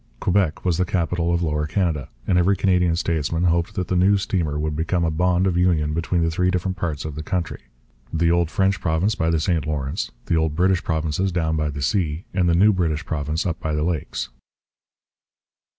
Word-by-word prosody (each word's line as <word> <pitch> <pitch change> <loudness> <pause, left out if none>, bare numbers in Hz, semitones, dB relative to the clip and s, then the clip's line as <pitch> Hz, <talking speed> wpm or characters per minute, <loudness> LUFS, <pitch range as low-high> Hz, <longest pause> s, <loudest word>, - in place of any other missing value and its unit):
Quebec 90 -4 0
was 90 -2 +1
the - - +4
capital 85 -1 0
of 85 0 +1
Lower 75 -1 -1
Canada; 80 -6 -1 0.2
and 90 - +1
every 95 +3 +3
Canadian 90 -3 +2
statesman 85 -1 -1
hoped 85 +4 +1
that 90 -4 -2
the 90 - -1
new 95 +3 +4
steamer 85 -6 -1
would 75 0 -2
become 85 +2 0
a 80 - 0
bond 90 +3 +2
of 95 -2 +1
union 80 -4 +2
between 85 +1 0
the 80 - +1
three 90 +3 +1
different 90 0 -1
parts 75 -5 -3
of 80 - -4
the 75 - -5
country 85 -2 -3 0.5
the 85 +1 +2
old 85 -2 +2
French 95 +2 +1
province 90 +6 +1
by 80 -7 0
the 80 -1 +2
St 80 -2 0
Lawrence, 70 -3 -2 0.2
the 85 - +1
old 80 -2 +1
British 95 +1 +2
provinces 80 +3 -1
down 80 -2 0
by 75 -1 0
the 70 -1 -5
sea, 85 -1 -1
and 90 -2 +2
the 85 - +3
new 105 +5 +5
British 85 -4 -1
province 75 +1 -2
up 85 -3 -2
by 80 -1 -2
the 75 - 0
Lakes. 80 -7 -2
85 Hz, 210 wpm, -22 LUFS, 80-90 Hz, 0.5 s, new